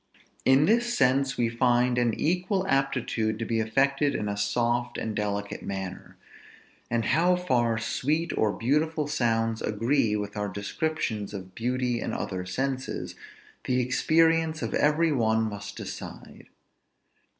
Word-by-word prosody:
In 135 +3 +5
this 235 +4 +2
sense 135 +1 +2
we 120 - +2
find 120 +1 +2
an 120 -2 +1
equal 185 +4 0
aptitude 130 - 0
to 115 - -3
be 115 0 0
affected 140 +6 +1
in 105 - -2
a 100 - -2
soft 120 +4 0
and 110 -1 -3
delicate 100 -1 -3
manner; 95 -1 -6 0.7
and 115 -2 0
how 175 +3 +3
far 120 -10 +1
sweet 150 +8 -1
or 110 - +2
beautiful 150 +7 0
sounds 115 -5 0
agree 115 +1 +1
with 105 -1 -4
our 105 0 -2
descriptions 105 0 -3
of 95 -1 -8
beauty 125 +1 -1
in - - -3
other 90 -2 -4
senses, 130 +5 -3 0.5
the 125 0 +1
experience 160 +5 +2
of - - -3
every 155 +2 +3
one 110 -4 +2
must 100 -2 -5
decide. - - -8
120 Hz, 140 wpm, -27 LUFS, 110-145 Hz, 0.7 s, In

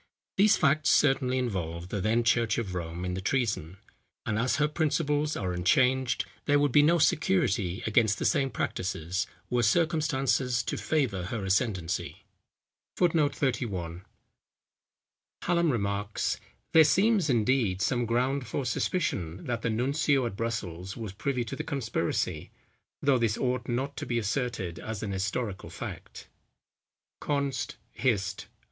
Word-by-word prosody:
These 210 +2 +5
facts 155 -1 +3
certainly 135 -2 +3
involve 90 -8 -3
the 100 - -2
then 115 +4 +2
church 115 -1 +2
of 105 -6 -3
Rome 85 0 -4
in 90 - -2
the 95 - -3
treason; 100 - -1 0.5
and 110 -1 0
as 125 +2 +1
her 150 +1 +2
principles 150 -1 0
are 95 -3 -2
unchanged, 125 +8 +2 0.2
there 145 - +4
would 145 -1 +2
be 145 - +6
no 165 +4 +4
security 150 - +1
against 110 -2 +3
the - - -2
same 140 -4 +2
practices, 95 -4 -2 0.2
were 125 0 +2
circumstances 135 -3 +1
to - - -3
favour 125 - 0
her 100 +1 -4
ascendency. 95 -4 -1 0.7
[Footnote 160 -5 +2
31: 95 - -2 1.4
Hallam 170 -1 +2
remarks, 100 -2 -1 0.3
"There 160 - +9
seems, 195 0 +3
indeed, 115 -5 +2
some 120 +3 0
ground 125 +2 0
for 130 +4 -3
suspicion, 95 - -1
that 120 -1 -2
the 115 - -1
Nuncio 135 +4 +1
at 115 - -4
Brussels 100 -5 -4
was 110 -5 -6
privy 125 +4 -1
to 115 - -6
the 155 - -4
conspiracy; 135 -8 -2 0.5
though 140 -3 +4
this 115 -2 +1
ought 125 0 -1
not 135 +4 -2
to - - -5
be 120 - 0
asserted 115 -6 -2
as 110 -2 -5
an 105 - -3
historical 100 +2 -3
fact." - - -8 0.9
_Const. 140 -3 -1 0.2
Hist. 105 -6 -1
120 Hz, 140 wpm, -28 LUFS, 100-140 Hz, 1.4 s, There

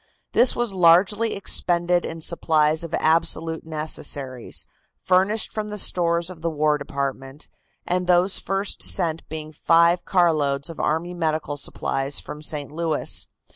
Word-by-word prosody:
This 250 - +4
was 240 -4 +1
largely 190 +5 +3
expended 175 -2 0
in 165 0 -6
supplies 155 -1 +2
of 165 - -3
absolute 165 0 +1
necessaries, 145 -5 -2 0.3
furnished 190 +4 +1
from 215 -1 -4
the 210 - -5
stores 170 -2 +1
of 170 -3 -12
the 165 - -1
War 150 -1 +1
Department, 140 0 -5 0.4
and 180 0 -1
those 180 +2 +3
first 195 +1 -3
sent 165 -1 +1
being 155 0 -7
five 170 +3 +3
carloads 155 -5 +1
of 165 - -12
army 165 +3 -1
medical 155 -3 -2
supplies 135 0 -3
from 150 - -9
St. 150 -2 -4
Louis. 160 -1 -1
165 Hz, 135 wpm, -23 LUFS, 150-180 Hz, 0.4 s, This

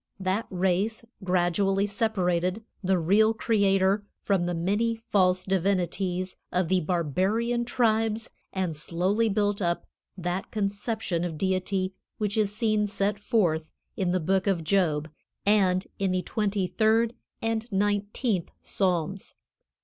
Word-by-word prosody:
That 190 +4 -1
race 190 +5 0 0.2
gradually 190 +2 +2
separated 195 -2 0 0.2
the 190 0 +2
real 210 +7 +3
Creator 200 -3 +2 0.2
from 190 -4 +1
the 175 - -1
many 205 +7 +1
false 185 -5 +1
divinities 185 -1 0 0.2
of 180 -2 0
the 185 0 +3
barbarian 190 - 0
tribes 225 -2 +1 0.2
and 185 -4 -2
slowly 185 +9 +1
built 205 0 +1
up 170 -1 0 0.3
that 180 +1 -3
conception 205 -3 -2
of 165 -3 -3
Deity 185 +1 0 0.2
which 210 -2 -1
is 210 -2 +2
seen 215 -1 +1
set 200 0 -1
forth 170 -8 +1 0.2
in 185 -2 0
the 185 - +2
Book 190 +4 +1
of 180 -4 +1
Job 155 -4 +1 0.4
and 190 -3 +3
in 195 -1 +1
the 185 0 0
twenty 205 -3 0
third 225 +4 +2 0.3
and 225 +1 -2
nineteenth 205 0 0
Psalms. 185 0 -1
195 Hz, 125 wpm, -27 LUFS, 180-215 Hz, 0.4 s, real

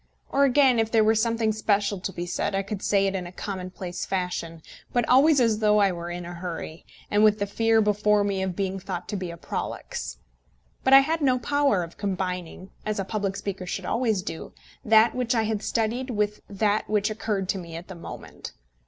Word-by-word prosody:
Or, 280 +1 +4
again, 265 -2 +4
if 225 -1 +1
there 225 -1 +4
were 220 +1 +4
something 225 0 +1
special 205 -2 0
to 190 - -4
be 175 -2 -5
said, 180 +2 -2
I 195 - 0
could 200 0 -5
say 200 -1 +2
it 195 - 0
in 185 -2 -3
a - - -9
commonplace 185 -2 -5
fashion, 175 -3 -3 0.3
but 245 -2 +1
always 275 +3 +6
as 225 -3 +2
though 210 -1 +4
I 200 -2 +4
were 170 -1 -5
in 175 0 -5
a 175 - -7
hurry, 170 -2 -7 0.2
and 205 +1 +4
with 215 -1 +5
the 205 - -1
fear 225 +2 +2
before 210 0 +3
me 200 -1 -1
of 190 -2 -2
being 195 0 -2
thought 180 -1 -5
to - - -2
be 185 -3 -4
prolix. - - -5 0.7
But 265 - +4
I 270 - +11
had 320 +3 -1
no 260 -3 +3
power 275 -6 +1
of 165 - -10
combining, 185 -2 -4
as 215 0 -2
a 195 - -2
public 200 -1 -2
speaker 195 -2 -5
should 185 +1 -4
always 220 -5 0
do, 165 - -7 0.3
that 220 +1 +5
which 250 -1 0
I 225 - +2
had 215 -1 -1
studied 230 +4 -1
with 210 -2 -1
that 205 +1 0
which 210 0 +1
occurred 210 -3 -2
to 195 - 0
me 170 -2 -9
at 170 +2 -8
the 190 - -8
moment. 170 - -9
205 Hz, 215 wpm, -25 LUFS, 185-225 Hz, 0.7 s, I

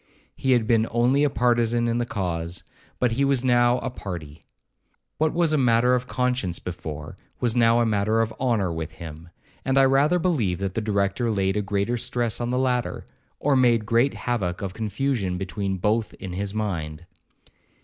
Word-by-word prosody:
He 130 -1 +1
had 120 -3 +2
been 115 0 +2
only 125 +5 +2
a 145 - +3
partizan 120 -2 +2
in 115 +1 0
the 120 - -1
cause, 85 -4 -3 0.3
but 125 -2 +1
he 130 +5 +1
was 135 -2 +2
now 120 0 +4
a 130 - -3
party. 85 - -7 0.8
What 155 0 +2
was 165 -2 +1
a 155 - +3
matter 125 0 +3
of 125 0 0
conscience 125 -9 -1
before, 80 -4 -7 0.2
was 120 -1 0
now 115 -1 +4
a - - +2
matter 110 0 +1
of 115 0 0
honour 110 -9 +1
with 80 0 -5
him; 80 0 -10 0.3
and 135 0 +1
I 135 - +6
rather 140 +6 +3
believe 140 - 0
that 95 -1 -3
the 115 - -1
Director 100 +2 0
laid 95 -2 0
a 105 - +1
greater 100 +4 -1
stress 120 -1 -2
on 120 - -1
the 125 - 0
latter, 125 -2 -1 0.3
or 145 -1 +2
made 120 -3 +4
a - - -11
great 120 +4 +2
havock 100 -7 -2
of 95 -2 -4
confusion 110 -3 -1
between 95 +1 -3
both 105 +4 0
in 95 -3 -7
his 100 +2 -3
mind. 85 -7 -3
115 Hz, 190 wpm, -24 LUFS, 95-125 Hz, 0.8 s, I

